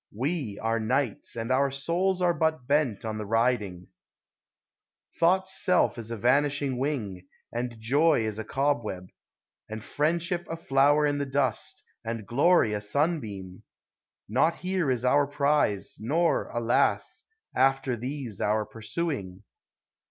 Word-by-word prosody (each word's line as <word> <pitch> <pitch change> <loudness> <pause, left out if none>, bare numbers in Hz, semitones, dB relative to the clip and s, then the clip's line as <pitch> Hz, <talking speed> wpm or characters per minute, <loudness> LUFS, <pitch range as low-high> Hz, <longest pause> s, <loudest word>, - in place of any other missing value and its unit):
We 130 - -3
are 115 0 0
knights, 125 +1 -1
and 115 +1 -3
our 135 +2 +3
souls 175 +7 0
are 175 -1 +4
but 160 -4 0
bent 140 -7 +1
on 110 -1 -3
the 105 - -4
riding! 110 -5 0 1.3
Thought's 190 +3 +2
self 180 -8 +2
is 115 -1 -7
a 115 - -4
vanishing 140 +2 +1
wing, 105 -10 -3 0.3
and 120 -1 -4
joy 140 +2 +3
is 110 0 -3
a - - -3
cob 135 +3 0
web, 90 -3 -6 0.6
And 110 0 -6
friendship 170 +5 -1
a 165 - -3
flower 145 -1 +3
in 145 -1 0
the 140 - -2
dust, 135 -3 -1 0.2
and 115 -2 -4
glory 135 - +3
a 105 - -2
sunbeam: 105 - -2 0.7
Not 135 +10 +2
here 185 -5 -1
is 125 -1 0
our 140 +3 +4
prize, 145 -8 0
nor, 160 +10 +1
alas! 120 0 0 0.3
after 135 -1 +2
these 125 -3 -5
our 105 +1 +1
pursuing. 110 - -4
130 Hz, 135 wpm, -27 LUFS, 110-150 Hz, 1.3 s, are